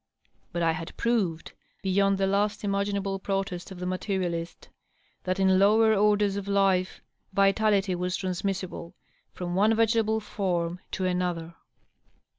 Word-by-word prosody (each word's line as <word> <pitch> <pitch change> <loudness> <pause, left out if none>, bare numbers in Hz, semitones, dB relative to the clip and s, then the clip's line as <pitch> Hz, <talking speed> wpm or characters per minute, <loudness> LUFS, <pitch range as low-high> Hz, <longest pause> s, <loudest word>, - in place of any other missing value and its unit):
But 170 0 -2
I 165 - +3
had 165 0 -6
proved, 200 -9 -1 0.3
beyond 195 +1 +2
the 195 - +1
last 205 +2 0
imaginable 200 -1 -1
protest 195 -2 -3
of 190 - -9
the 180 - -4
materialist, 180 -2 -3 0.6
that 185 +1 -1
in 190 -1 +4
lower 220 +3 +5
orders 205 -1 +2
of 200 -1 -5
life 195 -2 +1 0.3
vitality 200 0 +3
was 180 +1 -2
transmissible 185 -2 -4 0.4
from 175 -1 -5
one 210 +4 +3
v^table 220 -1 +2
form 180 -5 -2
to 190 - -1
another. 180 -2 -1
195 Hz, 130 wpm, -27 LUFS, 180-200 Hz, 0.6 s, lower